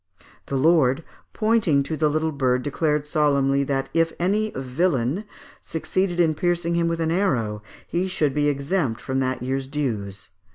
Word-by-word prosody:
The 140 - -3
lord, 150 0 +3 0.3
pointing 215 -11 +2
to 155 +3 -3
the 155 0 +2
little 155 +1 0
bird, 130 -3 +1
declared 150 +1 0
solemnly, 140 -2 +2
that 135 -1 -1
if 165 0 +2
any 205 +5 +1
'vilain' 135 - 0 0.4
succeeded 175 +3 -2
in 165 -2 +4
piercing 175 +1 0
him 170 0 +1
with 165 0 -1
an 160 0 0
arrow 115 - 0 0.3
he 180 +2 -1
should 155 -7 0
be 145 +1 +2
exempt 140 -3 -1
from 130 0 -2
that 130 -1 -1
year's 135 +1 -2
dues. 105 -10 -4
150 Hz, 160 wpm, -23 LUFS, 135-170 Hz, 0.4 s, in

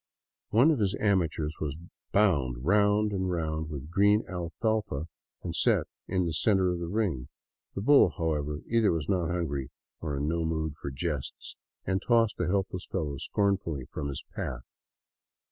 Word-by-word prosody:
One 125 +9 +5
of 150 - +1
his 100 -2 +1
amateurs 85 -6 +1
was 75 -1 -2 0.3
bound 70 - +2
round 105 +2 +3
and 95 -2 -1
round 80 -3 -2
with 75 +1 -7
green 105 +3 +4
alfalfa 90 -1 -2 0.4
and - - -4
set - - +3 0.2
in 90 -1 +1
the 85 - -1
center 95 +3 +3
of 90 - -2
the 85 - -3
ring. 90 - -1 0.5
The 100 - -2
bull, 140 -3 +6
however, 75 -2 -1
either 115 -2 +3
was 80 -4 -2
not 90 -4 +1
hungry 70 -7 -2 0.3
or 75 -4 -3
in 70 +2 -1
no 85 +1 0
mood 80 -1 -1
for - - -3
jests, 70 0 -4 0.3
and 95 +1 0
tossed 115 -2 +3
the - - 0
helpless 95 -1 -1
fellow 75 -7 -2
scornfully 95 - 0
from 70 - -3
his 70 - -5
path. 60 0 -4
85 Hz, 160 wpm, -29 LUFS, 75-100 Hz, 0.5 s, bull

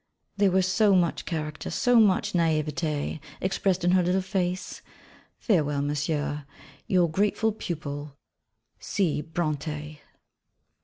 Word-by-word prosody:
There 200 -1 +4
was 190 0 +2
so 200 +2 +4
much 175 -2 +1
character, 155 -3 -4
so 245 -2 +3
much 205 -4 +3
naïveté 155 -2 0 0.2
expressed 190 -1 0
in 175 - +3
her 185 0 +5
little 180 +2 +1
face. 185 -2 -2 0.6
Farewell, 150 - +1
Monsieur 145 0 -2 0.4
Your 180 -2 +3
grateful 205 +6 +1
pupil, 145 -7 -6 0.6
C. 175 -7 0
Brontë. 155 -1 -4
170 Hz, 110 wpm, -26 LUFS, 150-190 Hz, 0.6 s, her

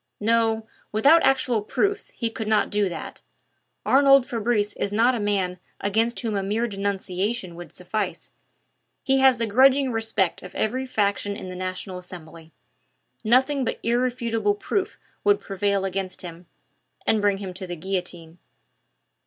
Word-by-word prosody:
"No, 225 0 +2 0.3
without 280 +10 +5
actual 260 -4 +2
proofs 400 - -1
he 230 -2 -3
could 220 -1 -5
not 215 -1 +2
do 205 -2 +1
that. 165 -2 -7 0.6
Arnould 275 -1 +6
Fabrice 220 -3 0
is 200 - -3
not 230 +5 +3
a 240 - -2
man 195 -3 -1 0.2
against 225 +4 0
whom 225 -4 -2
a 200 - 0
mere 210 +4 0
denunciation 200 -1 -2
would 175 +1 -10
suffice. 195 +2 -4 0.7
He 270 0 +2
has 265 -1 +5
the 230 - 0
grudging 260 +4 +4
respect 225 -5 0
of 180 - -11
every 255 +4 -1
faction 205 -3 0
in 185 - -7
the 185 - -7
National 185 0 -4
Assembly. 165 -2 -11 0.7
Nothing 260 +5 +3
but - - -2
irrefutable 235 -3 0
proof 375 - -2 0.3
would 410 0 +4
prevail 195 0 -1
against 190 -1 -3
him 170 0 -9 0.6
and 220 - +2
bring 205 -1 +2
him 195 -2 -6
to 185 0 -6
the 175 - -4
guillotine." 175 -2 -4
210 Hz, 150 wpm, -24 LUFS, 190-240 Hz, 0.7 s, Arnould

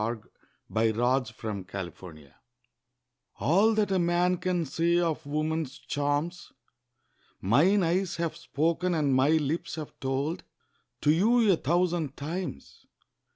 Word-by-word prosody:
A 115 +2 -1 0.5
BACHELOR 110 0 +2 0.3
TO 110 0 -9
A 110 - -1
MARRIED 95 -3 -6
FLIRT 75 -6 -13 1.0
ALL 205 +8 +3
that 210 -2 +1
a 190 - +2
man 175 +1 +2
can 175 -2 -1
say 165 +5 +1
of 165 -4 -1
woman's 155 -1 -2
charms, 145 +5 -2 0.9
Mine 170 - +3
eyes 180 +2 0
have 170 -2 -2
spoken 170 +2 -1
and 145 -4 +1
my 130 +2 +4
lips 160 0 0
have 155 -2 -7
told 140 +5 -2 0.6
To 150 - +4
you 220 +6 +4
a - - +5
thousand 170 -2 0
times. 160 - -6
160 Hz, 130 wpm, -28 LUFS, 135-175 Hz, 1.0 s, a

